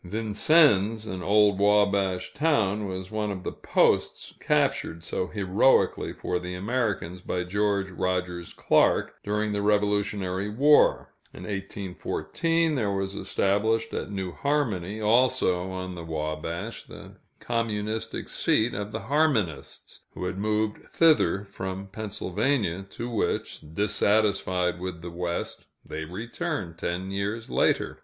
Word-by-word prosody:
Vincennes, 110 - +3
an 95 -4 -5
old 100 0 +4
Wabash 100 -2 +2
town, 110 -10 +1
was 95 0 -6
one 105 -1 -1
of 95 -2 -5
the - - -3
posts - - +1
captured 85 +1 0
so 90 - -2
heroically 100 +6 +2
for 90 - -3
the 90 0 -6
Americans 100 -4 -2
by 90 0 -2
George 100 +1 0
Rogers 90 -1 -2
Clark, - - +2
during 105 +1 -1
the 100 0 -1
Revolutionary 105 -2 0
War. 145 +8 +4 0.2
In - - -9
1814, 105 - -2
there 115 -8 0
was 95 0 -2
established 110 +3 0
at - - -3
New 95 -3 -4
Harmony, 110 - -1
also 110 -5 +2
on 95 0 -5
the 85 -1 -7
Wabash, 80 +6 -4
the - - -12 0.2
communistic 110 -2 -2
seat 115 +2 +1
of 105 +1 -4
the - - -3
Harmonists, 115 - -1 0.2
who 90 - -4
had 90 +1 -3
moved 105 +1 -1
thither 125 - +3
from 95 0 -5
Pennsylvania, 100 -1 -2
to 120 - -6
which, 115 -3 -2
dissatisfied 100 -3 +1
with 90 -2 -6
the 85 - -6
West, 85 0 -4 0.2
they 80 0 -5
returned 105 - -4
ten 90 +2 -3
years 100 +4 -3
later. - - +1
100 Hz, 125 wpm, -26 LUFS, 90-110 Hz, 0.2 s, old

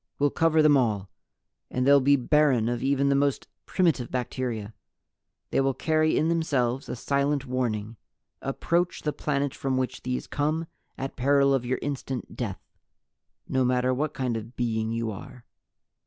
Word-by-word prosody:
We'll 145 0 +2
cover 160 -1 +3
them 150 -1 +6
all. 105 -6 0 0.6
And 125 0 -1
they'll 140 +1 +7
be 140 +2 +5
barren 135 -3 +3
of 120 -1 -2
even 140 +1 +2
the 140 - +3
most 140 -1 +1 0.2
primitive 165 -10 +1
bacteria. 120 -4 -3 0.8
They - - +2
will 135 -1 +1
carry 155 0 +2
in 155 - +2
themselves 140 -6 0
a - - -3
silent 140 +2 0
warning: 115 -4 -2 0.4
'Approach 170 +6 -1
the 150 - -1
planet 140 -2 -1
from 135 -1 -2
which 130 -1 -2
these 125 0 -3
come 155 +3 -1 0.3
at 135 +1 -5
peril 140 +1 +3
of 125 -2 0
your 130 - 0
instant 135 -3 -4
death... 105 -7 -4 0.8
not 130 -1 +1
matter 125 0 +2
what 150 +3 -2
kind 125 -4 -1
of 115 +3 -8
being 110 -2 -1
you 115 -1 -2
are!' 120 +4 -10
130 Hz, 160 wpm, -26 LUFS, 120-145 Hz, 0.8 s, they'll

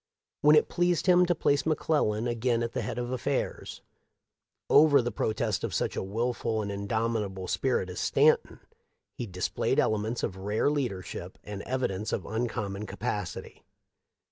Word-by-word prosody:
When 150 +1 +7
it 150 - +4
pleased 175 -1 +1
him 180 -1 +5
to 175 - +2
place 145 -3 +2
McClellan 140 -8 +1
again 120 0 0
at 115 - -4
the 125 - -1
head 110 - -4
of 120 0 -3
affairs, 130 +2 -3 0.8
over 145 -1 +6
the 120 -1 -1
protest 110 -1 -1
of - - -2
such - - -1
a - - -1
wilful 110 +2 -1
and 100 - -4
indomitable 100 -2 -2
spirit 125 -5 0
as 90 - -6
Stanton, - - +2 0.5
he 120 - -5
dis 90 -1 -2
played - - -1
elements 110 +2 0
of 95 -4 -2
rare 105 +8 0
leadership 95 -10 -4
and 100 -1 -6
evidence 110 -6 -2
of 90 - -2
uncommon 105 -3 -3
capacity. 105 -3 -5
115 Hz, 155 wpm, -28 LUFS, 100-130 Hz, 0.8 s, When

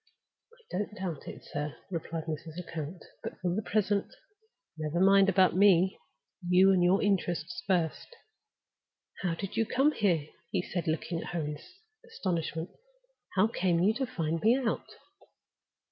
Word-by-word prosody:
"I 475 +1 -23
don't 205 +2 -2
doubt 180 -7 -5
it, - - -9
sir," 150 0 -4 0.2
replied 165 -1 -3
Mrs. 160 0 -5
Lecount. 165 -1 -6 0.2
"But - - -7
for 180 -1 0
the 210 - 0
present, 205 0 +1 0.7
never 155 +1 -2
mind 195 +1 +6
about 185 -2 +4
Me. 190 -1 +5 0.5
You 185 +2 +6
and 185 -2 +4
your 185 +3 +4
interests 180 -3 0
first." 180 - 0 1.1
"How 175 -3 0
did 195 +3 -5
you 225 - +3
come 270 +6 +3
here?" 180 - +1 0.2
he - - -1
asked, 175 - -1
looking 165 +1 -1
at - - -6
her 170 - 0
in 150 0 -4 0.4
astonishment. 175 - -3 0.6
"How 190 +1 +5
came 185 -6 +1
you 195 +5 +4
to 265 +2 -2
find 165 -4 -2
me 230 +4 +5
out?" 250 -4 -2
180 Hz, 150 wpm, -30 LUFS, 165-200 Hz, 1.1 s, mind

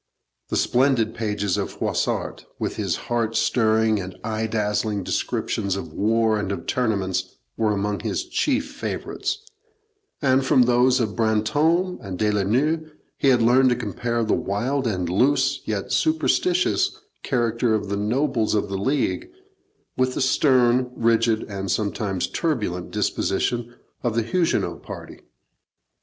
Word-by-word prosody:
The - - 0
splendid 125 -4 +2
pages 105 -4 -1
of - - -3
Froissart, - - -2
with - - -3
his - - -1
heart 115 -2 -1
stirring 110 -2 +2
and 90 -1 -7
eye 110 0 -2
dazzling 105 -2 -1
descriptions 95 +1 -1
of 95 - -6
war 110 +1 +2
and 100 -1 -2
of 85 -4 -4
tournaments, 100 -7 -1 0.2
were 110 -1 +1
among 100 0 -1
his 355 - -2
chief 285 -5 0
favourites; 405 +8 -4 0.7
and 135 -2 +3
from 130 -1 +4
those 125 +2 +3
of 110 -3 -1
Brantome 145 - +1
and 95 -3 -6
De 105 +1 +1
la 105 -1 +1
Noue 150 +10 +1 0.3
he 135 - +3
learned 125 +3 +4
to 125 - +2
compare 120 +1 -2
the 110 - +1
wild 125 +7 -1
and 90 -5 -1
loose, 130 +8 +2
yet 105 -3 -3
superstitious, 170 +3 +1 0.2
character 115 -1 +1
of 100 -2 -3
the 100 - -1
nobles 110 +1 0
of 105 - 0
the 95 -1 -3
League 145 - 0 0.7
with 130 0 +1
the - - -1
stern, 130 -2 +3
rigid, 115 -1 +2
and 100 -2 -5
sometimes 100 -2 -1
turbulent 105 - -2
disposition 120 0 -1 0.3
of 120 -3 -1
the 115 - +2
Huguenot 115 - 0
party. - - -9
115 Hz, 140 wpm, -23 LUFS, 105-130 Hz, 0.7 s, from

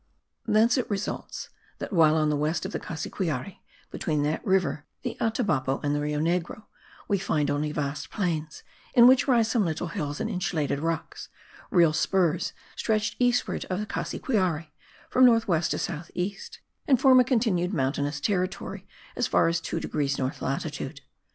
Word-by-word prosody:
Thence 230 +5 +4
it 250 - -3
results 205 0 -4 0.3
that, - - -6
while 160 -3 +5
on 155 -1 +2
the - - +1
west 155 +5 -1
of 190 - -4
the - - -3
Cassiquiare, 160 0 -4 0.3
between 150 -3 -1
that 150 +2 -1
river, 190 -7 +1 0.2
the - - -3
Atabapo, 200 - 0
and 145 0 +1
the 145 - 0
Rio 150 0 -1
Negro, 170 +5 -1 0.4
we 200 -2 +1
find 150 -6 0
only 150 +1 -1
vast 145 -1 -3
plains, 160 -6 -3 0.3
in 235 - +8
which 260 +3 +6
rise 235 -4 +4
some 230 -2 +2
little 165 0 -2
hills 150 -5 -4
and - - -1
insulated 155 -6 -1
rocks; 165 +1 -3 0.4
real 170 -4 +4
spurs 175 0 +1 0.2
stretch 215 -1 0
eastward 245 0 +1
of 185 +1 -3
the 210 - -2
Cassiquiare, 185 - -1 0.4
from 255 - +3
north 230 -2 +5
west 170 -3 +1
to - - -1
south 170 -1 -4
east, 195 +2 -4 0.3
and 265 -4 +4
form 260 -1 +7
a - - +7
continued 220 -8 +1
mountainous 145 -2 -1
territory 185 +2 -2 0.3
as - - 0
far - - +3
as 165 0 -1
2 165 - -3
degrees 140 -4 -1
north 130 0 -3
latitude. 140 0 -4
170 Hz, 170 wpm, -27 LUFS, 150-210 Hz, 0.4 s, in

